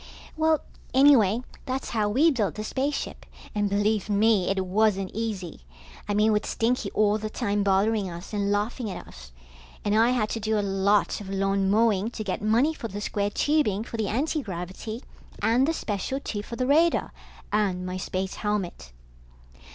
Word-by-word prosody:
Well, 315 -1 +2 0.3
anyway, 250 -5 +5 0.2
that's 260 0 -3
how 215 -3 +1
we 290 +10 +4
built 210 - -1
the 215 - -4
spaceship, 275 +6 -2 0.3
and 205 -2 0
believe 205 +1 +1
me, 205 -2 +3
it 195 -1 0
wasn't 195 0 +1
easy. 205 - -4 0.5
I 205 - +1
mean 215 +1 +4
with 210 0 +1
Stinky 230 -2 0
all 210 0 +3
the 215 0 -4
time 205 -3 -1
bothering 200 +1 +2
us 170 +4 -9
and 200 -1 0
laughing 215 +3 -1
at - - -7
us. 65 -1 -13 0.5
And 205 0 +2
I 225 +2 +5
had 240 -4 +1
to 225 - -2
do 220 0 0
a 205 - 0 0.2
lot 205 +1 +3
of 195 - -8
lawn 195 0 +1
mowing 215 -1 +3
to 220 - -6
get 195 -2 -3
money 235 +9 +3
for 235 - -6
the 205 -1 -6
square 205 -1 -1
tubing 220 -5 +1
for 230 - -7
the 220 -2 -1
antigravity 220 - -3 0.4
and 245 +5 +3
the - - +3
special 220 - -3
tube 205 -6 -5
for 235 - -6
the 255 - -1
radar, 320 +5 +3 0.4
and 190 -4 +1
my 185 0 -3
space 185 +1 -3
helmet. 195 - -3
210 Hz, 175 wpm, -26 LUFS, 200-230 Hz, 0.5 s, anyway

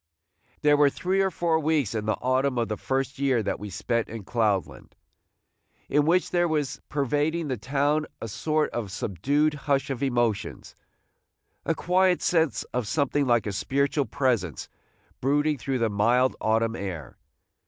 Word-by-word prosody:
There 145 0 +5
were 145 -1 +5
three 185 +6 0
or 190 - +2
four 165 -2 0
weeks 150 -8 +1
in 110 -1 -3
the 110 - +2
autumn 130 +1 +1
of 115 -1 0
the 110 - -1
first 135 +4 -2
year 130 -5 +2
that - - -2
we 105 - -6
spent 115 +5 -2
in 110 -2 -7
Cloudland, 105 -3 -1 0.9
in 150 +1 +2
which 180 +2 +2
there 175 0 +2
was 150 -5 -2
pervading 150 +3 0
the 130 - -1
town 145 +6 0
a - - -5
sort 155 +8 -1
of 110 -5 -4
subdued 140 - 0
hush 140 -2 -1
of 130 -1 -4
emotions, 120 -6 -1 0.5
– - - -48
a - - +2
quiet 180 +1 +2
sense 165 -4 +1
of 125 -4 -1
something 145 +1 0
like 120 -2 +3
a 105 - -2
spiritual 140 +8 0
presence 115 - -1 0.5
brooding 145 +2 +1
through 135 +1 -2
the 115 -2 +1
mild 120 +6 +2
autumn 115 +1 +1
air. 90 - -6
135 Hz, 165 wpm, -26 LUFS, 115-150 Hz, 0.9 s, There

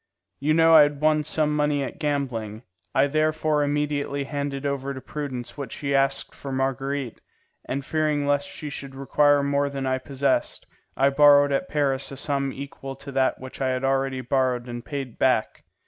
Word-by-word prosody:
You 155 +3 +2
know 165 0 +5
I 160 - +10
had 145 -1 +2
won 155 0 +3
some 150 0 +1
money 150 -1 +1
at 135 - -7
gambling; 125 -7 -2 0.3
I 135 - +5
therefore 155 +1 +1
immediately 145 -1 -1
handed 140 0 -4
over 140 -1 -2
to - - -6
Prudence 135 -2 -6
what 135 -5 -5
she 140 -1 -3
asked 135 0 +1
for 140 - -7
Marguerite, 135 -1 -2 0.4
and 135 +1 -3
fearing 155 -2 0
lest 145 0 +1
she 150 -2 -7
should 140 -1 -7
require 145 +1 +3
more 140 0 +1
than 135 -1 -4
I 130 0 0
possessed, 135 0 -1 0.3
I 135 +1 +4
borrowed 145 0 +6
at 140 +6 -1
Paris 140 -3 0
a 135 - -7
sum 140 -1 -1
equal 135 0 -7
to 140 +1 -9
that 135 -1 +1
which 130 +1 -9
I 130 - +1
had 130 0 -1
already 135 -1 0
borrowed 125 -1 0
and 120 -1 -6
paid 135 -5 -6
back. 130 -4 +1
140 Hz, 180 wpm, -25 LUFS, 135-145 Hz, 0.4 s, I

